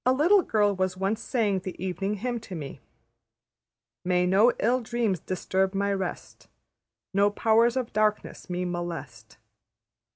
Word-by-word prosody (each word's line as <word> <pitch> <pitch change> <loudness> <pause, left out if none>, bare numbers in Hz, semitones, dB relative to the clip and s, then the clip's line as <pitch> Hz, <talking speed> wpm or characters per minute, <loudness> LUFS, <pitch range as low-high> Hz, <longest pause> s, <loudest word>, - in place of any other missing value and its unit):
A 255 - +3
little 345 +9 +4
girl 205 - +1
was 185 0 -1
once 200 +4 -1
saying 215 -7 0
the 185 0 -7
Evening 195 +2 -2
Hymn 240 +3 -3
to 200 -4 -9
me, 145 -4 -7 1.2
``May 180 0 +2
no 205 +6 +5
ill 250 +3 +1
dreams 230 -5 -1
disturb 190 +2 -1
my 200 +1 +1
rest, 190 -2 -5 0.7
No 200 +1 +4
powers 230 +3 +3
of 250 -3 -3
darkness 215 -2 -1
me 180 0 -2
molest.'' 165 -10 -6
200 Hz, 140 wpm, -26 LUFS, 185-225 Hz, 1.2 s, no